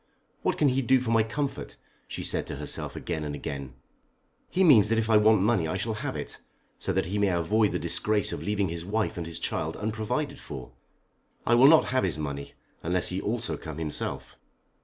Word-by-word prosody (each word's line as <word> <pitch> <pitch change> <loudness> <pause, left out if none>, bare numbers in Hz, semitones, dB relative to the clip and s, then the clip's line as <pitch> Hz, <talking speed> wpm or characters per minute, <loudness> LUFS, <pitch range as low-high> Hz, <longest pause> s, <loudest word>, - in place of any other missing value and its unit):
"What - - 0
can 145 - +4
he 130 +1 +1
do 130 +1 +4
for 125 -2 -2
my 115 -1 +5
comfort?" 115 - -3 0.3
she - - -5
said - - -1
to - - -4
herself - - -4
again 80 - -3
and 75 -1 -4
again. 70 -3 -6 0.7
"He 190 - +2
means 115 - +7
that 115 - +2
if 115 0 +1
I 110 - +7
want 105 -2 +5
money 105 -6 +2
I 90 - -2
shall 110 +3 -1
have 110 - -4
it, - - -6 0.4
so - - -2
that - - +1
he 100 +4 -2
may 100 - +3
avoid 95 +5 +2
the - - 0
disgrace 105 -1 0
of - - -5
leaving 100 -2 0
his 85 0 -4
wife 105 +4 -1
and 85 -3 -4
his 85 - -4
child - - -2
unprovided 110 +7 -2
for. 65 -4 -8 0.7
I 120 - +3
will 125 +3 +7
not 160 +1 +6
have 130 - +2
his 90 -5 -1
money, 70 -2 -5 0.3
unless 90 +1 +1
he 95 +2 -2
also 115 +1 -2
come 80 -2 -8
himself." 80 -2 -4
105 Hz, 210 wpm, -27 LUFS, 85-115 Hz, 0.7 s, means